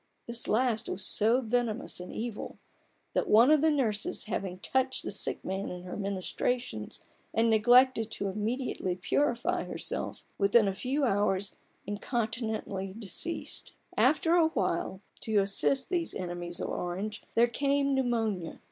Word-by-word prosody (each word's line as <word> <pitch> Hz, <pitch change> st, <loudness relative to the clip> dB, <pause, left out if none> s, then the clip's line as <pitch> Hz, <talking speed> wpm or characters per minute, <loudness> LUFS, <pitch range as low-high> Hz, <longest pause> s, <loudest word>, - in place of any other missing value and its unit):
This 235 Hz, 0 st, -4 dB
last 225 Hz, 0 st, +1 dB
was 190 Hz, +1 st, -2 dB
so 230 Hz, +4 st, +3 dB
venomous 240 Hz, -1 st, -1 dB
an 180 Hz, -, -7 dB
evil, 225 Hz, -1 st, -5 dB, 0.6 s
that -, -, 0 dB
one 235 Hz, +7 st, +7 dB
of 305 Hz, -2 st, +5 dB
the 320 Hz, -, +5 dB
nurses 230 Hz, -8 st, 0 dB
having 190 Hz, -3 st, -3 dB
touched 260 Hz, +7 st, 0 dB
the -, -, -3 dB
sick 200 Hz, -, -3 dB
man 190 Hz, +1 st, -2 dB
in 180 Hz, 0 st, -7 dB
her 180 Hz, -, -6 dB
ministrations, 200 Hz, -, -2 dB, 0.3 s
and 225 Hz, 0 st, +4 dB
neglected 240 Hz, +1 st, +5 dB
to 200 Hz, -, -2 dB
immediately 210 Hz, -2 st, -2 dB
purify 285 Hz, -, 0 dB
herself, -, -, -4 dB, 0.2 s
within 200 Hz, +2 st, +5 dB
a 195 Hz, -, +1 dB
few 265 Hz, +8 st, -1 dB
hours 200 Hz, -4 st, +1 dB, 0.3 s
incontinently 215 Hz, -3 st, -3 dB
deceased. 230 Hz, -, -5 dB, 0.2 s
After 325 Hz, +2 st, +4 dB
a 340 Hz, -2 st, +5 dB
while, 190 Hz, -, -1 dB, 0.2 s
to 220 Hz, -2 st, 0 dB
assist 200 Hz, -, +2 dB
these 350 Hz, -2 st, 0 dB
enemies 175 Hz, -1 st, -4 dB
of -, -, -3 dB
Orange, 195 Hz, +5 st, -3 dB
there 235 Hz, -, +6 dB
came 280 Hz, +3 st, +1 dB
pneumonia. 225 Hz, -9 st, 0 dB
220 Hz, 140 wpm, -30 LUFS, 195-255 Hz, 0.6 s, one